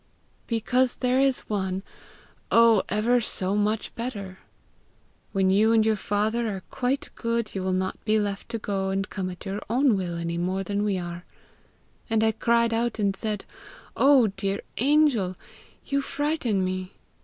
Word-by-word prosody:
'Because 245 +2 +1
there 255 0 +1
is 270 -1 +2
one 190 -2 -2 0.7
oh, 230 -3 +6
ever 235 +4 +2
so 195 -2 0
much 210 +1 0
better! 200 -6 -6 0.9
When 190 -2 +2
you 215 +4 +4
and 220 -1 +4
your 220 -1 +3
father 215 +4 0
are 195 -3 -4
quite 260 +2 -1
good, 230 -2 -2
you 195 - -3
will 185 0 -1
not 185 0 -2
be 215 0 +2
left 205 -1 -3
to 230 - -2
go 195 -3 -2
and 195 +1 -1
come 190 -2 -4
at 180 +2 -9
your 200 +2 -3
own 250 0 +3
will 175 -3 -3
any 170 0 -3
more 185 +2 -1
than 205 +1 -1
we 205 -2 0
are.' 175 -1 -6 0.9
And 220 -1 +2
I 220 - +4
cried 235 +1 +2
out, 235 0 0
and 200 -2 +1
said, 210 0 -4 0.5
'Oh, 275 -3 +6
dear 195 -1 -2 0.2
angel! 260 -9 +3 0.5
you 280 -1 0
frighten 275 -10 -1
me!' 185 0 -4
210 Hz, 165 wpm, -26 LUFS, 190-235 Hz, 0.9 s, oh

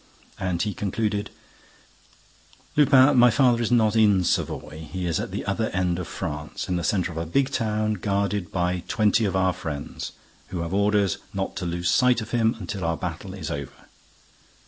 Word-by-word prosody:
And 90 -2 -1
he 105 -2 -2
concluded: 105 +2 -2 1.5
"Lupin, 140 -1 +6
my 125 0 +8
father 120 -1 +3
is 115 - 0
not 115 -3 +3
in 105 -4 +4
Savoy. 80 -2 -2
He 90 +1 -3
is 85 -3 0
at - - -3
the - - -5
other - - -1
end 90 -1 0
of 90 - -5
France, 75 -1 -5
in 90 - -1
the 85 - -1
centre 90 +2 0
of 80 - -5
a 85 - -2
big 135 +10 +1
town, 110 -3 0
guarded 100 -2 -1
by 90 -1 0
twenty 110 0 +2
of 95 -2 -1
our 95 -1 +2
friends, 75 -4 -6 0.3
who 90 -2 -4
have 85 +2 -4
orders 100 -1 +2 0.2
not 95 -1 -2
to 90 - -3
lose 85 +1 -2
sight 125 +4 +4
of 110 -1 -7
him 115 0 +2
until 95 0 -5
our 85 -1 0
battle 90 +2 -5
is 80 -4 -5
over. 70 -2 -7
95 Hz, 185 wpm, -25 LUFS, 85-110 Hz, 1.5 s, my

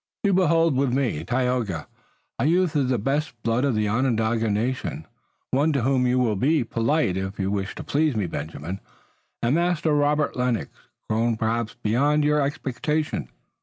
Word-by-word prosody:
You 200 -2 +3
behold 165 -4 +3
with 135 -1 +1
me, 120 - 0
Tayoga, 120 -7 -1 0.5
a - - +1
youth 175 0 +2
of 135 -3 +2
the 125 - +2
best 135 +3 -2
blood 115 +3 +1
of 140 -5 +1
the 105 0 +1
Onondaga 115 -1 +1
nation, 115 +5 -2 0.5
one 145 +5 +2
to 140 -4 0
whom 130 -1 +2
you 125 +1 +2
will 120 -4 +2
be 140 +7 +2
polite 115 - 0
if 95 +1 -4
you 95 0 0
wish 100 -1 -2
to - - -6
please 150 -2 +1
me, 105 -3 0
Benjamin, 80 +3 -5 0.6
and 120 +3 +2
Master 170 -2 +1
Robert 145 0 +2
Lennox, 125 -3 -1 0.4
grown 115 +1 +1
perhaps 115 0 -1
beyond 145 +8 +2
your 150 0 +3
expectations." 145 +2 -2
125 Hz, 165 wpm, -24 LUFS, 110-150 Hz, 0.6 s, You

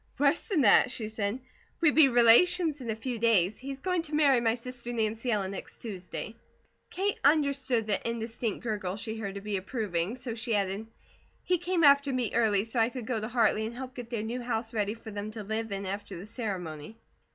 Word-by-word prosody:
"Worse 285 +1 +3
than 370 -9 +2
that," 210 -1 +6
she 230 -4 -2
said. 215 +2 -2 0.4
"We 325 -3 +5
be 310 -2 +7
relations 295 +7 +5
in 240 - -6
a 220 - 0
few 235 +1 -4
days. 210 -4 +3
He's 275 +1 -6
going 365 -2 0
to 310 -2 -4
marry 280 -5 +4
my 225 -1 +2
sister 245 0 -7
Nancy 225 +1 -1
Ellen 200 -4 0
next 195 - -8
Tuesday." 200 0 -6 0.6
Kate 395 +2 -1
understood 280 -5 +2
the 215 +2 0
indistinct 230 -1 -3
gurgle 205 -5 -2
she 220 +1 -4
heard 200 -2 -5
to 200 - -5
be 205 -1 -2
approving, 195 -1 -2
so 245 -2 -5
she 230 0 -2
added: 200 +2 -1 0.6
"He 360 -1 +1
came 350 -1 0
after 280 -1 +6
me 250 -4 -1
early 205 -4 +3
so 230 +2 -2
I 225 +1 +3
could 250 -2 -7
go 230 -1 -1
to 215 - -3
Hartley 225 -2 +2
and 235 - -8
help 260 0 -7
get 245 -2 -8
their 230 -3 -2
new 240 +3 -4
house 235 -1 -3
ready 210 -1 -1
for 225 -1 -10
them 205 +1 -5
to 215 -2 -6
live 220 +1 -3
in 195 0 -3
after 200 0 -5
the 180 - -8
ceremony." 195 - -5
230 Hz, 210 wpm, -29 LUFS, 210-255 Hz, 0.6 s, be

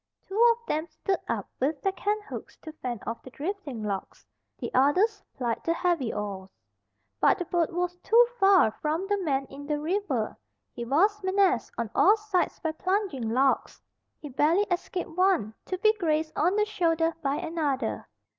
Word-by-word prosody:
Two 415 +5 +2
of 470 0 -26
them 315 -3 -1
stood 385 +2 -2
up - - -2
with 285 +3 0
their 390 - +2
canthooks 415 +2 -4
to 315 - -7
fend 240 -4 -4
off 230 +1 -4
the - - -11
drifting 285 - -5
logs; 200 -2 -5 0.3
the - - -5
others 370 - +3 0.2
plied 240 -3 -1
the 335 - +1
heavy 335 -10 0
oars. 200 -2 -5 0.7
But - - +4
the 355 - -3
boat 340 -1 +1
was 355 0 -2
too 460 +6 +5
far 390 - +6
from 315 +4 -1
the 410 0 +1
man 275 -5 0
in 280 +1 -10
the 295 -1 0
river. 310 - -1 0.4
He 235 - -5
was 395 - +2
menaced 375 -8 +2
on 230 -2 -3
all 415 +3 +5
sides 415 -4 -1
by 320 - -1
plunging 365 - -1
logs. 265 +4 +1 0.4
He 295 - -8
barely 310 +9 +3
escaped 355 0 -2
one 365 - +2
to 370 - -3
be 430 +3 +4
grazed 315 -2 0
on 360 +5 +2
the 420 0 +3
shoulder 330 -5 +1
by 275 -2 0
another. 305 -5 -2
330 Hz, 175 wpm, -27 LUFS, 270-390 Hz, 0.7 s, far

